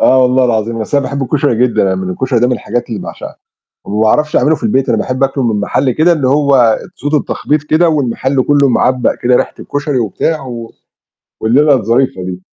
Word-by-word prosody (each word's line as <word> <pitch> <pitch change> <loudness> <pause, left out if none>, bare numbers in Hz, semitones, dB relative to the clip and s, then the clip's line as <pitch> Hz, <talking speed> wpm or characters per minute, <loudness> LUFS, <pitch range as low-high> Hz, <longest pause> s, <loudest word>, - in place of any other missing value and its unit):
آه 130 0 +4
والله 125 +1 +3
العظيم. 115 -1 -1
أصل 125 +6 -2
أنا 135 - -2
باحب 140 0 -3
الكشري 145 -1 0
جدًا. 120 - 0
يعني 95 -1 -1
الكشري 115 +6 -1
ده 125 - +3
من 125 - 0
الحاجات 120 0 -3
اللي 110 - -5
باعشقها - - -8 0.5
وما 105 +2 -2
باعرفش 150 +7 +1
أعمله 155 +2 +3
في - - -12
البيت. 170 - 0
أنا - - +2
باحب 130 +1 -2
آكله 135 0 -1
من 110 -3 0
محل 130 +6 0
كده 155 +8 +2
اللي 150 -6 0
هو 135 -5 +3 0.2
تسوده 145 +2 -1
التخبيط 150 +1 -2
كده 160 +3 +2
والمحل 135 -2 0
كله 140 -1 +2
معبّق 125 0 +1
كده 125 0 +3
ريحة - - 0
الكشري 145 -2 -3
وبتاع 150 +8 -2
و 115 -2 -7 0.7
والليلة 140 +7 +3
الظريفة 115 -3 0
دي. 90 0 -6
130 Hz, 200 wpm, -13 LUFS, 115-145 Hz, 0.7 s, آه